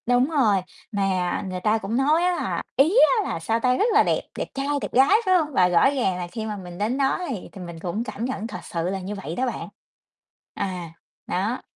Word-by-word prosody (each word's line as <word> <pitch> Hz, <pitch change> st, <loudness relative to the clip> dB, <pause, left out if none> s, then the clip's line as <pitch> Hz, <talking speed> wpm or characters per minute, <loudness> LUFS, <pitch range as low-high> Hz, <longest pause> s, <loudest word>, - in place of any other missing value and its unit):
Đúng 245 Hz, +3 st, +3 dB
rồi, 225 Hz, -, +3 dB, 0.3 s
mà 190 Hz, -3 st, 0 dB
người 185 Hz, 0 st, -4 dB
ta 215 Hz, +1 st, +3 dB
cũng 220 Hz, +2 st, -2 dB
nói 300 Hz, +5 st, +3 dB
á 360 Hz, 0 st, +2 dB
là, -, -, -2 dB
ý 315 Hz, +9 st, +4 dB, 0.3 s
á -, -, -4 dB
là, -, -, -2 dB
sao 225 Hz, +8 st, 0 dB
ta, 250 Hz, +1 st, +2 dB
rất -, -, +2 dB
là 435 Hz, -, +6 dB
đẹp, -, -, +1 dB, 0.2 s
đẹp -, -, -1 dB
trai, 275 Hz, 0 st, -3 dB
đẹp -, -, -5 dB
gái, 265 Hz, +2 st, +5 dB, 0.2 s
phải 375 Hz, -, +4 dB
hông? 305 Hz, -3 st, -1 dB
Và 180 Hz, -6 st, +5 dB
rõ 180 Hz, +8 st, +5 dB
ràng 245 Hz, -10 st, 0 dB
là 175 Hz, -1 st, -4 dB
khi 220 Hz, -2 st, -4 dB
mà 210 Hz, -1 st, -4 dB
mình 175 Hz, -2 st, -9 dB
đến 215 Hz, +6 st, -1 dB
đó 275 Hz, +3 st, +1 dB
thì 220 Hz, -9 st, -5 dB
thì 195 Hz, -, -10 dB
mình 170 Hz, -2 st, -8 dB
cũng 185 Hz, +6 st, -3 dB
cảm 235 Hz, -1 st, -5 dB
nhận 235 Hz, -4 st, -3 dB
thật 205 Hz, -6 st, -6 dB
sự 170 Hz, +1 st, -3 dB
là 195 Hz, 0 st, -2 dB
như 195 Hz, +3 st, -5 dB
vậy 180 Hz, -4 st, -6 dB
đó 260 Hz, -, 0 dB
bạn. 245 Hz, -, -4 dB, 0.9 s
À, 180 Hz, -4 st, -4 dB, 0.3 s
đó. 205 Hz, +7 st, -1 dB
215 Hz, 240 wpm, -24 LUFS, 185-265 Hz, 0.9 s, là